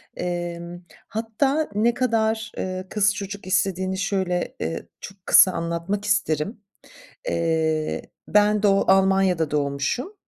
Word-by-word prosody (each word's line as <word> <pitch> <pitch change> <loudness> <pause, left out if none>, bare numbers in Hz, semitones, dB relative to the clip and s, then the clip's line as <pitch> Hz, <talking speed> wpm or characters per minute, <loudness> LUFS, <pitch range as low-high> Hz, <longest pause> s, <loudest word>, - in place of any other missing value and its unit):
Emm, 175 0 -4 0.3
hatta 265 +8 -1
ne 230 +3 +3
kadar, 220 -3 0
eee, 185 0 -4
kız 205 -1 +2
çocuk 200 -1 -6
istediğini 190 0 0
şöyle, 190 -3 -1
eee, 80 +1 -4
çok 195 -1 -11
kısa 185 - +7
anlatmak 170 +5 -3
isterim. 200 - 0 0.7
Eee, 160 -2 0 0.3
ben 210 0 +3
do 195 -1 +4
Almanya'da 190 -4 +3
doğmuşum. 145 - -1
190 Hz, 110 wpm, -23 LUFS, 170-210 Hz, 0.7 s, kısa